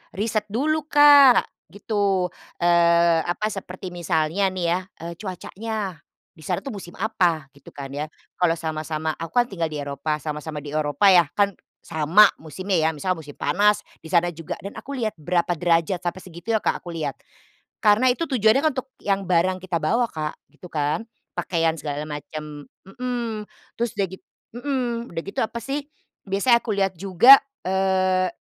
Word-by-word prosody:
riset 210 +1 -1
dulu 300 +8 -1
Kak, 290 -4 +7 0.2
gitu. 200 -3 -1 0.3
Eee, 170 -1 +4
apa, 210 +5 -1
seperti 185 -2 -7
misalnya 170 +2 0
nih 185 -2 -3
ya, 180 - +2 0.2
eee, 170 - -5
cuacanya, 200 -1 -5 0.3
di - - -24
sana - - -2
tuh 275 - -5
musim 175 -2 -11
apa, 175 -9 0
gitu 140 -1 -17
kan 135 -1 -7
ya, 145 +2 -4 0.3
kalau 175 -2 +3
sama-sama 155 -1 -3
aku 165 0 -7
kan 245 0 +5
tinggal 170 -4 -1
di 155 - -7
Eropa, 145 +2 -2
sama-sama 150 0 -5
di - - -9
Eropa 150 +4 +2
ya 175 -4 +6
kan 200 -1 +3 0.3
sama 165 +6 +5 0.2
musimnya 185 +5 -5
ya, 160 - +3
misalnya 180 +3 -2
musim 145 -1 -12
panas 210 +2 +3 0.2
di 160 - -10
sana 175 -1 +3
juga 165 -1 -6
dan 200 +4 -8
aku 280 0 -7
lihat 220 -3 -1
berapa 175 +2 +1
derajat, 170 +1 +1
sampai 175 +1 -2
segitunya 185 +6 -2
Kak - - 0
aku 175 - -8
lihat. 155 -4 -3 0.7
Karena 215 +4 +4
itu 260 +7 0
tujuannya 235 -4 +3
kan 310 - +4
untuk 260 0 -4
yang 195 -1 0
barang 185 +1 +2
kita 185 -2 -2
bawa 230 +10 +1
Kak, 155 -1 -4 0.2
gitu 155 +4 -13
kan. 150 +7 -1 0.3
Pakaian 165 -2 0
segala 145 0 -4
macam, 150 0 -7 0.2
mmm, 230 0 -4 0.3
terus 235 -2 -1
udah 200 - +1
git 190 0 -8 0.3
mmm, 240 -2 -2
udah 165 -1 -5
gitu 195 - -4
apa 225 - -2
sih, 275 +3 -2 0.5
biasanya 235 +5 +3
aku 215 -4 -3
lihat 195 -1 +1
juga, 200 +8 +8 0.2
eee, 185 0 +2
185 Hz, 170 wpm, -23 LUFS, 160-215 Hz, 0.7 s, juga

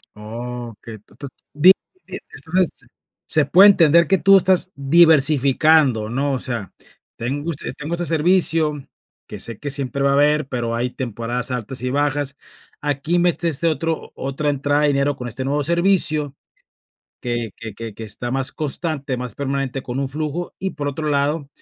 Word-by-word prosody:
Okey, 115 0 -8
to 105 - -24
to 140 - -8 0.3
di 160 +6 +7 0.4
entonces 180 +2 -3 0.6
se - - +2
puede 195 +4 +7
entender 170 -3 +4
que 195 - +3
tú 195 +1 +6
estás 185 0 +1
diversificando, 140 -4 +4
¿no?, 140 +4 -1
o 130 - -2
sea, 115 -7 -4 0.4
tengo 145 +7 -3
este 150 - -6
tengo 150 +3 -5
este 175 0 -3
servicio, 160 -3 +2 0.4
que - - -9
sé 115 -3 -5
que 145 - -5
siempre 140 -1 -2
va 140 0 +2
a - - +2
haber, 150 0 +2
pero 120 -3 -3
hay 125 +2 -2
temporadas 120 0 -4
altas 125 +1 -2
y 125 - -2
bajas, 145 0 -1 0.4
aquí 145 +4 -1
metiste 170 -2 0
otro 160 +1 -2
otra 135 +2 -3
entrada 145 +1 0
de - - +4
dinero 140 0 0
con 125 - -6
este 125 +3 -5
nuevo 145 +2 0
servicio 170 -4 +3 0.9
que 120 -3 -3
que 115 -1 -8
que 115 -1 -8
que 110 - -8
está 120 +3 -5
más 130 0 0
constante, 150 -3 -3
más 125 -3 -6
permanente 135 -1 -3
con 125 +1 -5
un 135 - -2
flujo, 155 +4 -5
y 190 - -3
por 145 -1 -4
otro 150 +2 -4
lado, 145 +1 -1
140 Hz, 165 wpm, -20 LUFS, 125-160 Hz, 0.9 s, di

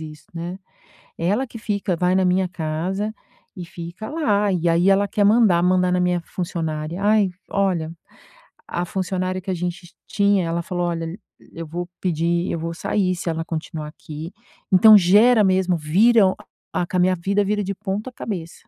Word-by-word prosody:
isso, 155 -1 -10
né. 170 +2 -5 0.6
Ela 205 +11 0
que 235 - -10
fica 205 -4 -2
vai 180 +2 +1
na 190 0 +3
minha 185 +1 +2
casa 180 +5 -3 0.4
e 180 - -7
fica 175 +4 -8
lá, 210 -10 +1
e 175 -2 0
aí 170 +3 +3
ela 200 +1 +3
quer 205 - 0
mandar, 205 -5 +4
mandar 180 0 +3
na 180 0 +1
minha 180 0 +1
funcionária 165 -1 -4
ai, 205 -1 +3 0.2
olha. 185 -5 0 0.8
A 175 - -2
funcionária 185 0 -2
que 190 - -8
a - - +1
gente 175 0 -5
tinha, 200 -3 +2
ela 165 +1 -1
falou: 175 +1 -3
"Olha, 165 +1 -4 0.4
eu 165 - -6
vou 175 +3 -5
pedir 170 0 0
eu 165 - -2
vou 165 +1 -4
sair, 185 +2 -1
se 175 - -7
ela 165 0 -3
continuar 160 -2 -5
aqui", 155 +2 -9 0.4
então 215 +4 +8
gera 210 +5 +6
mesmo, 185 -2 +2
vira 195 +10 +4 0.5
ah, 175 - -1
com 180 - -3
a - - +2
minha 185 +1 +3
vida, 195 +4 0
vira 205 +1 -1
de 195 +1 -3
ponta 210 +4 -4
cabeça. 180 -9 -6
180 Hz, 175 wpm, -22 LUFS, 170-200 Hz, 0.8 s, então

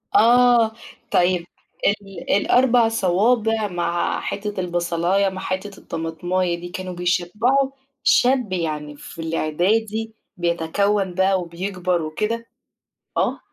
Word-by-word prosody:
آه. 240 0 +5 0.4
طيب، 175 -1 +2 0.4
ال 195 -3 -3
ال4 245 +1 +4
صوابع 220 +2 +2
مع 175 -1 -1
حتّة 205 -1 -4
البصلاية 175 +2 +1
مع 185 0 -7
حتّة 190 +2 -4
الطمطماية 170 +2 -2
دي، 175 0 -7
كانوا 185 0 -6
بيشبّعوا 210 +10 +1 0.3
شاب 245 -6 +3
يعني 150 -4 -3
في 165 - -10
الإعدادي 210 +8 0 0.2
بيتكوَّن 180 +3 0
بقى 190 0 +2
وبيكبر 180 0 -2
وكده؟ 215 +9 -2 0.7
آه. - - +1
185 Hz, 100 wpm, -22 LUFS, 175-220 Hz, 0.7 s, آه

